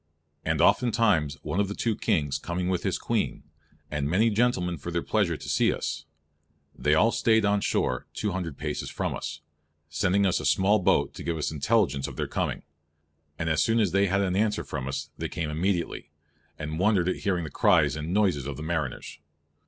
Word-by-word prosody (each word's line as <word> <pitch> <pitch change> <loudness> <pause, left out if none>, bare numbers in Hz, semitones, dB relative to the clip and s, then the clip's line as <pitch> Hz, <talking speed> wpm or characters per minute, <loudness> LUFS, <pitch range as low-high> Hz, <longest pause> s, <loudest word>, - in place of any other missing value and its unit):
And - - 0
oftentimes 105 - +3
one 95 - -2
of 100 - +2
the 100 - -5
two 115 -2 0
Kings 75 -7 0
comming 90 +1 -3
with 90 -2 0
his - - -1
Queene, - - -2 0.5
and 75 -1 -1
many 110 +7 +3
gentlemen 100 -7 +1
for 85 - -6
their 85 0 -1
pleasure 95 -7 +1
to - - -10
see - - +3
us, - - -4 0.7
they 75 +1 +2
all 115 +8 +4
stayed 110 -1 +3
on 100 0 +2
shore 65 -9 0
200 90 -7 -3
paces 75 -1 -4
from - - -2
us, 75 -1 -6 0.5
sending 100 +5 +2
us 95 - +2
a - - -5
small 100 +3 +3
boat 90 - +2
to - - -8
give 85 -1 -2
us 75 - -2
intelligence 70 -4 +1
of - - -8
their - - -2
comming; - - -2 0.7
and 80 - -3
as 80 -1 +2
soon 115 +1 +2
as 105 -6 +2
they 100 +2 +3
had 100 +2 +1
answere 105 +1 +1
from 65 -1 -5
us 70 - -4
they - - -3
came 80 -3 -3
immediately, 85 -2 -1 0.5
and 80 +1 -4
wondered 95 -3 +3
at 95 - 0
hearing 90 -4 -1
the 80 - -6
cries - - +3
and 75 +2 -4
noyses 90 -9 +1
of 70 -3 -5
the 75 - -6
mariners. 80 -6 -3
90 Hz, 195 wpm, -27 LUFS, 75-105 Hz, 0.7 s, all